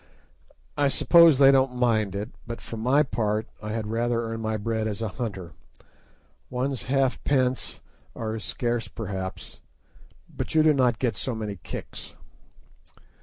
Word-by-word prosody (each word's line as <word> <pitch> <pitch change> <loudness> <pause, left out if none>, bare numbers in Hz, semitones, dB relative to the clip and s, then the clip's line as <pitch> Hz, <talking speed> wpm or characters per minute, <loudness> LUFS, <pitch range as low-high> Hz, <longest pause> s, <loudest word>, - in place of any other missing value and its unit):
I 145 - +4
suppose 165 +2 +6
they 135 0 +7
don't 130 -1 +3
mind 110 -5 +1
it, 105 +4 -4 0.2
but 115 0 -5
for - - -8
my 125 +5 +1
own - - +1
part 110 -1 0
I 105 - -5
had 110 0 -2
rather 115 +2 0
earn 115 0 -4
my 110 0 -1
bread 110 +1 -1
as 105 -2 -4
a 110 -1 -2
hunter. 95 -6 -5 1.0
One's 130 0 -2
halfpence 130 0 0 0.3
are 110 -1 -3
as 110 -2 -5
scarce 120 +5 -2
perhaps, 95 -3 -6 0.7
but - - -6
you 155 - +6
do 155 -1 +5
not 125 -4 +2
get 115 -4 -1
so 130 - -3
many 105 -2 -4
kicks. 85 - -8
115 Hz, 155 wpm, -26 LUFS, 110-130 Hz, 1.0 s, they